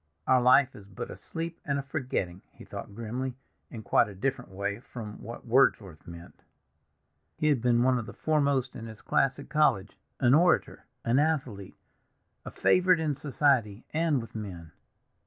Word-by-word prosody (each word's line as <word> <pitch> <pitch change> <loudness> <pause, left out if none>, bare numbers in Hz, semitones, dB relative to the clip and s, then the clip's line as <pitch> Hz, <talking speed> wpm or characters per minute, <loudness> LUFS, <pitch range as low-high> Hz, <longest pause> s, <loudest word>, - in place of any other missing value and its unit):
"'Our 130 -1 +4
life 130 +2 +5
is 100 -2 -13
but 95 - -7
a - - -7
sleep 165 0 -6
and 140 -1 -1
a 140 - -3
forgetting,'" 125 - -3
he - - -14
thought 100 - -8
grimly, 120 +3 -4 0.3
"in 115 -3 -8
quite - - +3
a 100 - -10
different 125 +3 -2
way 100 +2 -3
from 110 -4 -9
what 115 +3 -9
Wordsworth 115 - +2
meant." 85 +1 -12 1.0
He 155 - +1
had 140 -6 +2
been 120 0 +3
one 130 -1 +3
of 110 - -6
the 100 - -8
foremost 140 -4 0
in 115 - -7
his 110 -1 -11
class 135 -1 +1
at 140 - -10
college, 105 -11 +1 0.2
an 125 -1 +4
orator, 175 +4 +3 0.2
an 120 +3 +3
athlete, 135 -11 -1 0.7
a - - -5
favorite 180 -1 +3
in 155 -2 0
society 130 -6 +1
and 160 -3 +2
with 115 - -9
men. 90 -7 -7
125 Hz, 175 wpm, -28 LUFS, 105-140 Hz, 1.0 s, life